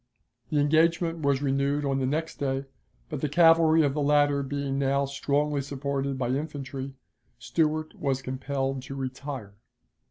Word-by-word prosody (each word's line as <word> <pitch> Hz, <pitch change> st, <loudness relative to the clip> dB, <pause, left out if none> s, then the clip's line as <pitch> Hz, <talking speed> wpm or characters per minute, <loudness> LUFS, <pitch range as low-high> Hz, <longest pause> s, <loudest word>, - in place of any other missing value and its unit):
The 150 Hz, -, 0 dB
engagement 165 Hz, +3 st, +2 dB
was 140 Hz, -2 st, +1 dB
renewed 140 Hz, +1 st, +1 dB
on 135 Hz, -1 st, 0 dB
the 130 Hz, -, 0 dB
next 160 Hz, +4 st, -2 dB
day, 135 Hz, -1 st, -1 dB, 0.4 s
but 150 Hz, -3 st, -5 dB
the 150 Hz, -, 0 dB
cavalry 165 Hz, 0 st, +5 dB
of 140 Hz, -2 st, +1 dB
the 150 Hz, -, -1 dB
latter 145 Hz, 0 st, +3 dB
being 140 Hz, 0 st, -2 dB
now 140 Hz, 0 st, +2 dB
strongly 140 Hz, +1 st, 0 dB
supported 140 Hz, 0 st, -3 dB
by 125 Hz, -2 st, -1 dB
infantry, 135 Hz, -1 st, -4 dB, 0.4 s
Stuart 155 Hz, +6 st, -1 dB
was 135 Hz, -2 st, -2 dB
compelled 135 Hz, 0 st, -2 dB
to 135 Hz, +2 st, -8 dB
retire. 130 Hz, -5 st, -6 dB
140 Hz, 150 wpm, -27 LUFS, 135-150 Hz, 0.4 s, cavalry